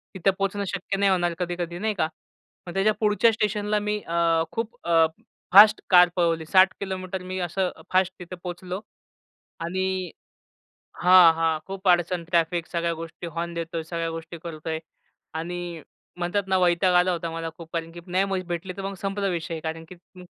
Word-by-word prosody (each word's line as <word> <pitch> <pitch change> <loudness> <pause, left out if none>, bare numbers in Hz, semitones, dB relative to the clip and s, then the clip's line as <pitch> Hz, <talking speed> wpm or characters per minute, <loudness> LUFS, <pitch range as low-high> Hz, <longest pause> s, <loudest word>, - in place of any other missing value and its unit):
तिथे 190 +1 +2
पोहचणं 195 +1 -1
शक्य 190 +2 -3
नाही 200 0 +3
होणार 175 -2 +1
कधी-कधी 175 -1 -3
नाही 215 +2 0
का. 165 - +1 0.6
मग 175 - -6
त्याच्या 195 +3 +3
पुढच्या 215 +2 +4
स्टेशनला 210 0 0
मी 210 0 -1
अ, 165 -1 +2
खूप 230 +1 -4
अ, 165 -1 +5 0.5
फास्ट 210 +2 +9
कार 180 -1 +7
पळवली. 165 -3 +1
60 185 +2 +5
किलोमीटर 190 -1 -4
मी 185 0 -4
असं 180 +1 -1 0.2
फास्ट 185 0 +3
तिथे 180 +1 -8
पोहचलो 180 +2 -5 0.8
आणि 185 0 -2 0.9
हां, 180 -2 +8
हां. 165 -1 +1
खूप 195 0 -3
अडचण 175 0 +2
ट्रॅफिक 170 0 0
सगळ्या 170 -1 -1
गोष्टी 165 +1 -8
हॉर्न 170 +1 -4
देतोय, 165 0 -4
सगळ्या 165 0 -3
गोष्टी 165 +1 -7
करतोय 160 -1 -4 0.6
आणि 170 0 -5 0.4
म्हणतात 175 +3 0
ना 190 - +3
वैताग 180 0 +3
आला 180 +1 +4
होता 170 -1 -3
मला 165 0 -4
खूप 165 -1 -11
कारण, 165 -1 -3
की 170 - -9
नाही 185 +2 +1
मग 195 -1 -2
भेटली, 175 +2 -3
तर 195 - -5
मग 195 0 -4
संपला 195 0 -2
विषय 170 -2 -3
कारण, 160 +1 -5
की 185 - -10 0.3
अ - - -11
180 Hz, 175 wpm, -25 LUFS, 170-190 Hz, 0.9 s, फास्ट